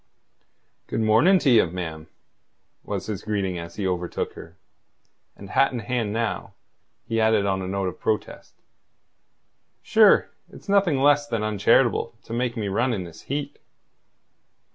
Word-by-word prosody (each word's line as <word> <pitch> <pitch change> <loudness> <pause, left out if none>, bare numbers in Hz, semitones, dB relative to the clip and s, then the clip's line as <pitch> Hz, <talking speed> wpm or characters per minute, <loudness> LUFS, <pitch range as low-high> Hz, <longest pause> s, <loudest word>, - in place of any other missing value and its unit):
"Good - - -2
morning 115 - +5
to 150 - +1
ye, 115 -3 +6
ma'am," 80 -3 -6 0.8
was - - -4
his 105 -4 -4
greeting 95 -4 -2
as 85 0 -9
he 100 - -3
overtook 90 -2 -2
her; - - -12 0.8
and 100 0 -11
hat 135 - +3
in 125 - -4
hand 115 -1 -2
now, 115 0 -3 0.5
he 115 -1 0
added 110 -2 +3
on 95 -1 0
a 95 - -4
note 95 0 -2
of 90 - -6
protest: 110 -1 -3 1.3
"Sure, - - +5 0.2
it's - - -14
nothing 195 -7 +3
less 145 +1 +3
than 115 -5 -2
uncharitable 110 +3 +2
to 115 - -9
make 120 0 -2
me 105 -2 -2
run 120 +6 0
in 95 -4 -3
this 85 -2 -12
heat." 140 +1 -4
110 Hz, 150 wpm, -24 LUFS, 95-125 Hz, 1.3 s, ye